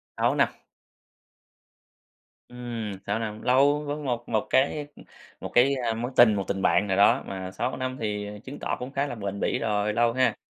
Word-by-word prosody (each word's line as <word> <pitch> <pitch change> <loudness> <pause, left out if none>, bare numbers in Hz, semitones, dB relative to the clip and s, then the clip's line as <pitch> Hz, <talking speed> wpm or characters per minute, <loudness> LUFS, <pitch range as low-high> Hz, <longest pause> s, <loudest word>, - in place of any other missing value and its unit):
6 - - +1
năm. - - +4 2.0
Ừm, 120 -4 -5
6 105 +2 -1
năm, 110 -1 -5
lâu 140 +4 +3
với 145 0 -3
một 125 -5 -3
một 110 -2 0
cái 145 +2 +1 0.5
một - - -6
cái, 135 +3 +5
ơ, 120 -3 -1
mối 120 +3 -4
tình, 115 -3 +7
một 100 - -1
tình 95 - -2
bạn 95 +3 +3
nào 95 - 0
đó 100 - +5
mà 95 -1 -5
6 125 - -3
năm 130 0 -3
thì 105 -2 -3 0.2
chứng 135 +2 -9
tỏ - - -2
cũng 125 +2 -6
khá 140 +1 -1
là 120 - -5
bền 100 -2 -5
bỉ - - 0
rồi, 105 -1 0
lâu 115 +1 +2
ha. 125 -3 +2
115 Hz, 195 wpm, -26 LUFS, 105-130 Hz, 2.0 s, tình